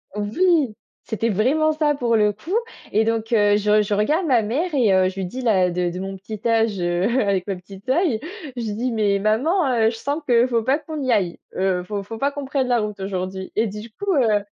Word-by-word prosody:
Oui, 275 - +1 0.3
c'était 225 0 -2
vraiment 265 +10 +2
ça, 300 -1 +1
pour 235 -4 +1
le 210 -1 +3
coup. 310 - -10 0.4
Et 220 +1 +3
donc 225 0 -1
heu, 205 -2 +4
je 210 +1 +3
je 205 0 -1
regarde 305 - +1
ma 250 -5 +4
mère 295 +11 -2
et 230 -8 +3
heu, 185 0 +4
je 190 - -10
lui 190 - -3
dis, 250 +9 -6
là, 190 -7 +2
de 180 +1 -1
de 175 - +1
de 180 - -6
mon 195 +1 -5
petit 210 +2 -8
âge, 225 -3 +2
heu, 175 +1 0 0.2
avec 195 -1 0
ma 195 - -1
petit 190 +2 -12
œil, 285 - +2 0.4
je 240 - -4
lui 215 -3 -3
dis: 245 +4 -2
«Mais 210 -3 +1
maman, 270 - +1
heu, 225 -1 +3
je 230 - -5
sens 285 +6 -3
qu'il 240 0 +4
faut 235 -2 +1
pas 265 +5 +2
qu'on 305 -1 -6
y 260 - 0
aille, 185 -6 0 0.2
heu. 185 -1 0
Faut 200 +1 -4
faut 225 +3 -8
pas 280 +3 +1
qu'on 285 -1 -6
prenne 265 -2 -1
la 245 -1 +2
route 210 -2 -4
aujourd'hui». 190 -1 -4
Et 220 - +2
du 210 +3 -8
coup, 400 - -2
heu 215 -6 +2
220 Hz, 245 wpm, -22 LUFS, 200-260 Hz, 0.4 s, heu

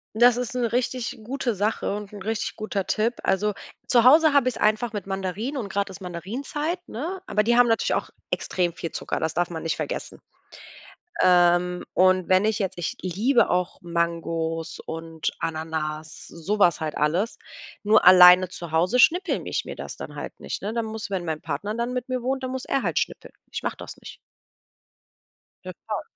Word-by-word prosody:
Das 240 +1 +6
ist 250 -1 -3
'ne 235 -2 0
richtig 245 -1 -2
gute 245 0 -2
Sache 205 0 -1
und 205 0 -7
'n 205 - -9
richtig 220 +2 -3
guter 215 -3 -3
Tipp. 225 +4 +1
Also, 205 +2 +1 0.3
zu 240 -2 +4
Hause 305 +5 +7
habe 280 -3 +4
ich's 250 - -4
einfach 215 +2 +1
mit 205 -3 -5
Mandarinen, 195 +8 -3
und 225 -6 -3
gerade 200 0 -2
ist 190 - -10
Mandarinenzeit, 260 - -4
ne? 335 +11 -5
Aber 210 - +1
die 235 +2 +3
haben 245 0 +6
natürlich 225 - +1
auch - - -2 0.2
extrem 175 -2 -1
viel 165 0 -6
Zucker, - - -4
das 160 0 -1
darf 175 0 0
man 165 -2 -5
nicht 165 -1 -1
vergessen. - - -5 1.0
Ähm, 180 0 +4
und 185 0 +3
wenn 185 +2 +4
ich 220 0 0
jetzt 190 -3 -2
ich 175 - -3
liebe 220 +8 +2
auch 180 0 -1
Mangos 165 -1 -2
und 165 0 -4
Ananas, 155 -1 -4
so 185 +6 -3
was 175 -4 +4
halt 155 -2 -3
alles. 175 +9 0 0.4
Nur 215 +1 +4
alleine 180 0 +9
zu 170 -2 -8
Hause 175 +10 +2
schnippel 355 +7 +3
ich - - -2
mir - - -6
das - - -7
dann - - -8
halt - - -7
nicht, - - -6
ne? 205 +2 -3
Dann 230 0 -1
muss, 220 -1 -6
wenn 190 -3 -2
mein 160 -2 -3
Partner 205 +2 -3
dann 235 +2 -2
mit 250 0 -4
mir 255 -1 -2
wohnt, 265 +1 -2
dann 255 - -3
muss 260 0 -4
er 275 - -1
halt - - +1
schnippeln. - - -5 0.2
Ich - - -5
mache - - -2
das - - -9
nicht. - - -12 1.4
Ja, - - -6
klar. - - -3
200 Hz, 195 wpm, -24 LUFS, 175-240 Hz, 1.4 s, alleine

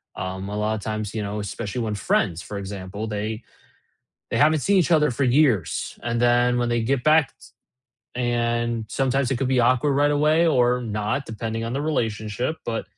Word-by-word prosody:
Um, 95 +1 -5
a 105 - -5
lotta 105 +1 -1
times, 110 0 -4
you 110 - -2
know, 105 +1 -4
especially 105 +3 -4
when 110 -2 -2
friends, 90 -3 0
for 100 +3 -7
example, 100 +2 -6
they 110 +2 -4 0.9
they - - -1
haven't 155 +1 +4
seen 200 +7 +2
each 180 -1 +2
other 150 -2 +4
for 135 +4 -1
years, 125 - +1
and 120 0 -1
then 120 0 +3
when 120 0 0
they 120 -1 +1
get 130 +1 0
back 155 -1 +4
t - - -18 0.7
and 120 -1 0
sometimes 135 +2 0
it 135 - +1
could 130 0 -1
be 130 -1 +3
awkward 130 +4 +3
right 145 +1 +3
away 155 +3 +3
or 125 -4 +2
not 110 +4 -2
depending 115 0 -4
on 115 - -4
the 135 - -2
relationship, 115 -1 -2
but, 115 -1 -2
120 Hz, 190 wpm, -23 LUFS, 105-135 Hz, 0.9 s, haven't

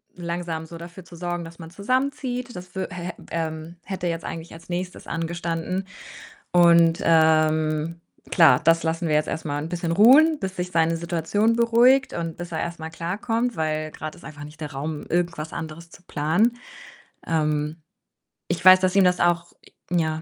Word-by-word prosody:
langsam 170 -2 -4
so 170 - -9
dafür 175 +2 -10
zu 175 - -14
sorgen, 175 0 -4
dass 165 0 -11
man 165 -1 -10
zusammenzieht. 250 +3 -2
Das 180 +1 -10
wü 190 - -2
hä 180 -1 -5 0.2
ähm, 160 0 -4
hätte 190 -1 -5
jetzt 165 -1 -2
eigentlich 165 0 -7
als 165 - -14
Nächstes 180 +1 -5
angestanden. 170 +2 -3 0.6
Und, 170 -1 +5
ähm, 155 0 +2 0.3
klar, 160 -8 +6
das 165 +1 +4
lassen 165 +1 -1
wir 150 - +1
jetzt 150 - +1
erst 160 0 -4
mal 145 -1 -2
'n 160 - -4
bisschen 170 -1 -2
ruhen, 280 - +6
bis 190 -1 -4
sich 180 0 -3
seine 165 -1 +2
Situation 170 +7 0
beruhigt 235 +3 +4
und 165 -2 -4
bis 175 0 -7
er 160 - -3
erstmal 165 -1 -5
klarkommt, 220 +8 -2
weil 155 -1 -2
grad 155 0 -7
ist - - -17
einfach 145 -1 -9
nicht 150 +2 -12
der 150 -2 -6
Raum, 150 +2 -5
irgendwas 170 -2 -2
anderes 165 +1 -7
zu 175 - -16
planen. 175 +10 +1 0.7
Ähm, 150 -1 0 0.7
ich 175 0 -2
weiß, 185 0 +9
dass 185 +1 +1
ihm 195 - +6
das 180 0 +3
auch 170 0 +1 0.4
ja. 160 -2 0
170 Hz, 175 wpm, -24 LUFS, 160-180 Hz, 0.7 s, weiß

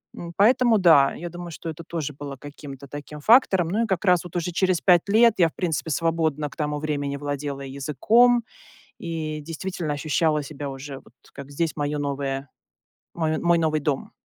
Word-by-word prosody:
м, 170 -1 -7
поэтому, 235 +2 +4
да, 160 -8 +5
я 175 +1 -6
думаю, 175 0 -8
что 165 - -7
это 160 +1 -7
тоже 155 -3 -4
было 140 0 -7
каким-то 140 0 -10
таким 145 +2 -8
фактором. 190 - +4
Ну, 215 +6 +1
и - - -2
как 190 -1 -1
раз 180 -2 +4
вот 175 -1 -11
уже 175 0 -1
через 185 0 +1
5 180 0 +3
лет 225 +2 +5
я, 170 -2 +5
в - - -26
принципе, 165 -3 -2
свободно 160 -2 0
к - - -16
тому 150 -1 -2
времени 145 -2 -2
владела 145 -1 -4
языком 155 - +2 0.5
и 160 -2 -4
действительно 165 0 -4
ощущала 150 +1 +1
себя 145 0 -6
уже 135 +1 -8
вот - - -17 0.2
как 140 0 -10
здесь 160 +3 -2
моё 145 0 -2
новое 140 -1 -3 0.7
мой 160 -2 -1
мой 170 0 +3
новый 155 -2 +1
дом. 145 -2 -2
155 Hz, 185 wpm, -24 LUFS, 145-175 Hz, 0.7 s, да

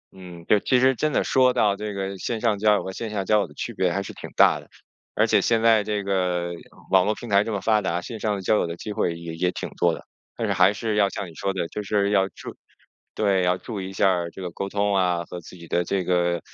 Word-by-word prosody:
嗯， 90 -3 -11
对， 105 - +4
其 125 +5 +2
实 130 +1 +4
真 155 +4 0
的 - - +1
说 130 -1 +4
到 105 -4 +2
这 105 +1 -5
个 100 0 -4
线 115 +3 -3
上 110 -3 +1
交 105 0 +4
友 - - -1
和 95 - -5
线 110 +4 -5
下 100 -2 -3
交 105 +2 +3
友 100 - -1
的 75 - -16
区 - - -5
别 90 -2 +1
还 100 +3 -1
是 - - -8
挺 - - -9
大 - - +5
的。 - - -17 0.5
而 - - +4
且 - - +3
现 115 -1 +2
在 110 -2 +5
这 105 -1 -2
个 90 -3 0 0.4
网 95 -1 +5
络 105 +1 +1
平 120 - -9
台 100 0 +4
这 115 - -4
么 100 - -1
发 110 0 +2
达， 90 -3 -1
线 110 +5 -7
上 105 -1 -1
交 100 +4 +2
友 - - 0
的 85 - -5
机 105 +4 -6
会 85 -4 0
也 85 -1 -7
也 90 +2 0
挺 - - -5
多 85 - +1
的， - - -9 0.3
但 115 - -1
是 100 - +1
还 90 +1 +5
是 110 +1 -2
要 100 -1 +3
像 100 0 -5
你 85 - -12
说 95 +4 -2
的 90 -3 -2
就 105 - -5
是 100 0 0
要 95 -2 +3
注 - - -10 0.6
对， 100 -3 +2
要 90 0 +2
注 105 +2 -6
意 95 - -5
一 - - -8
下 90 -3 +1
这 95 - -10
个 90 - -4
沟 100 +3 -4
通 100 0 0
啊， 90 -2 +1
和 90 - -8
自 85 - -13
己 85 -1 -12
的 85 - +1
这 95 +2 -1
个 85 -1 +1
100 Hz, 300 characters per minute, -24 LUFS, 90-105 Hz, 0.6 s, 大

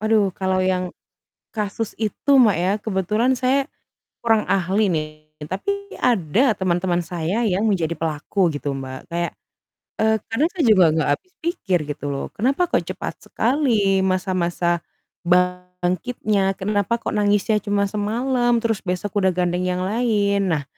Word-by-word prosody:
Waduh, 215 -3 +2
kalau 190 0 0
yang 185 -1 -1 0.6
kasus 210 0 -3
itu, 220 +6 -1
Mbak, 215 -9 +5
ya 180 +3 +1
kebetulan 215 +4 0
saya 270 +2 +2 0.6
kurang 225 -2 +2
ahli, 195 +3 +2
nih, 155 -2 0 0.4
tapi 400 - -3
ada 225 - +2
teman-teman 175 -1 +1
saya 175 +6 -2
yang 195 +2 +1
menjadi 170 -5 0
pelaku 165 +4 0
gitu, 145 -1 -3
Mbak. 130 -1 -8
Kayak, 170 0 -2 0.7
eee, 220 0 +3
kadang 275 +9 +1
saya 340 - -1
juga 205 -5 +6
enggak 160 -1 0
habis 370 - -37
pikir 205 - 0
gitu 145 0 -5
loh. 140 - -3
Kenapa 275 - +1
kok - - +1
cepat - - -5
sekali 225 -7 +1
masa-masa 180 -2 0 0.4
bangkitnya, 180 +3 0
kenapa 205 +2 0
kok - - -3
nangisnya 205 +1 +2
cuma 205 -1 +1
semalam, 240 +5 0
terus 225 -3 -1
besok 185 +2 -2
udah 190 - +4
gandeng 180 0 0
yang 180 0 -1
lain. 200 -3 +1
Nah, 150 -3 0
195 Hz, 140 wpm, -22 LUFS, 180-220 Hz, 0.7 s, juga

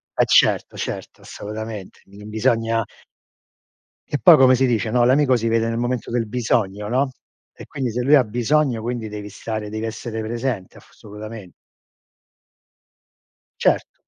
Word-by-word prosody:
E - - +3
certo, - - +3
certo, - - -6
assolutamente. 110 -1 -8
Non 105 +2 -12
bisogna 115 0 +1 1.3
E 145 - -1
poi 175 -3 +9
come 130 -2 +6
si 130 +1 +2
dice, 115 -3 0
no: 120 +1 +3
"L'amico 130 +1 +4
si 115 -1 0
vede 115 0 +1
nel 115 0 -2
momento 120 0 -2
del 120 -1 -1
bisogno." 105 -3 -1
no, 130 +3 +1 0.5
e - - -11
quindi 130 -3 -3
se 125 +2 -2
lui 140 +4 +4
ha 130 - +5
bisogno, 120 +2 0
quindi 120 -1 -3
devi 105 -1 -7
stare, 110 0 -5
devi 110 +1 -4
essere 110 0 -5
presente 115 -3 -4
assolutamen 105 -2 -11 2.1
Certo. - - +1
115 Hz, 145 wpm, -21 LUFS, 110-125 Hz, 2.1 s, poi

